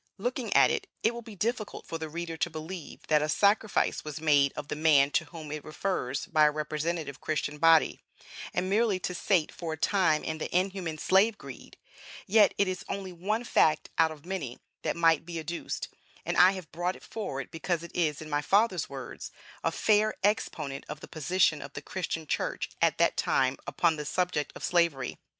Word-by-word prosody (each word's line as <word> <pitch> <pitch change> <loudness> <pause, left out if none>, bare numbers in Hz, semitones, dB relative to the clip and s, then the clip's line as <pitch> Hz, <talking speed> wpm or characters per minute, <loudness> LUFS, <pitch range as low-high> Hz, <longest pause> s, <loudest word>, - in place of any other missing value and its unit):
Looking - - -3
at - - +6
it, - - -2 0.2
it 225 - +3
will 235 - -6
be 220 -2 -11
difficult 220 +1 -3
for 165 - -5
the 160 -1 -5
reader 170 +1 -5
to 170 - -1
believe 160 +1 -8
that 155 -1 +3
a 155 - -1
sacrifice 205 +5 +2
was 150 0 -6
made 145 -3 +4
of 145 - -6
the - - -3
man 150 -2 +4
to 165 - +1
whom 155 0 -9
it 150 -1 -5
refers 155 -5 -2
by 155 -2 +4
a - - +6
representative 155 -1 -3
Christian 150 -1 -2
body, 165 0 +5 0.5
and 185 - -1
merely 210 0 +2
to 180 - -3
sate 175 -2 +1
for 165 -2 -5
a - - -6
time 170 -3 +2
the 160 +2 -2
inhuman 185 -4 -2
slave 200 +7 +3
greed; - - -11 0.5
yet 215 +1 +5
it 200 - +3
is 185 -1 -3
only 195 -2 -4
one 210 +7 -1
fact 155 -9 +2
out 160 -1 +5
of 155 -1 -11
many 170 -10 -4 0.2
that - - -1
might 165 -2 +4
be 170 0 -6
adduced, 165 +2 -4 0.4
and - - -1
I 185 +2 +7
have 185 -4 -8
brought 175 +2 -2
it - - -15
forward 140 - -5
because 165 +1 -2
it 170 - -10
is, 155 -3 0
in - - -9
my 145 -1 0
father's 205 +9 +2
words, - - -7 0.3
"a - - +1
fair 215 0 +2
exponent 155 -9 -1
of 150 0 -6
the - - -9
position 160 0 +1
of 140 0 -9
the 145 - -6
Christian 165 -2 -4
Church - - -2
at - - +3
that - - +2
time 130 0 +2
upon 165 -2 +2
the 150 - -5
subject 160 -3 -1
of - - -9
Slavery." 170 -6 +1
165 Hz, 200 wpm, -29 LUFS, 150-190 Hz, 0.5 s, I